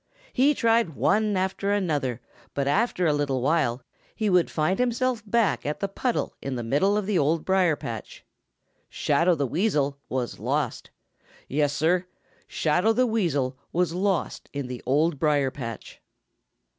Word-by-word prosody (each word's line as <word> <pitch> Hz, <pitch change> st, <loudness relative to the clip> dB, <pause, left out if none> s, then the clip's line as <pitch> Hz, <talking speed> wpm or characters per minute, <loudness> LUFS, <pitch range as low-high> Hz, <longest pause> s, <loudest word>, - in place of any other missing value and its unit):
He 285 Hz, +4 st, +4 dB
tried 230 Hz, -, +2 dB
one 210 Hz, +4 st, +2 dB
after 190 Hz, +2 st, -1 dB
another, 145 Hz, -, -1 dB, 0.3 s
but 140 Hz, -1 st, 0 dB
after 185 Hz, +3 st, +1 dB
a 155 Hz, -, +3 dB
little 145 Hz, -3 st, 0 dB
while 130 Hz, -3 st, +1 dB, 0.3 s
he 215 Hz, -3 st, 0 dB
would 180 Hz, -2 st, +3 dB
find 165 Hz, +5 st, 0 dB
himself 250 Hz, -1 st, 0 dB
back 230 Hz, -1 st, +2 dB
at 150 Hz, +1 st, -3 dB
the 200 Hz, -, -1 dB
puddle 235 Hz, +5 st, -2 dB
in 135 Hz, -1 st, -3 dB
the 120 Hz, -, -3 dB
middle 150 Hz, -, +2 dB
of 210 Hz, -, -1 dB
the 195 Hz, -3 st, +1 dB
Old 155 Hz, +3 st, +1 dB
Briar 185 Hz, -4 st, +3 dB
patch. 115 Hz, -7 st, -8 dB, 0.6 s
Shadow 170 Hz, +5 st, +2 dB
the 140 Hz, -2 st, 0 dB
Weasel 145 Hz, -, 0 dB
was 125 Hz, -2 st, -3 dB
lost! -, -, -2 dB, 0.6 s
Yes, 145 Hz, +1 st, +1 dB
Sir, 175 Hz, +4 st, +1 dB, 0.4 s
Shadow 180 Hz, +8 st, +2 dB
the 255 Hz, +2 st, +3 dB
Weasel 145 Hz, -, 0 dB
was 175 Hz, -1 st, 0 dB
lost 190 Hz, -1 st, -1 dB
in 140 Hz, -2 st, -3 dB
the 125 Hz, -1 st, -6 dB
Old 150 Hz, +3 st, +2 dB
Briar 145 Hz, -3 st, +2 dB
patch. 115 Hz, -6 st, -8 dB
165 Hz, 155 wpm, -25 LUFS, 140-200 Hz, 0.6 s, He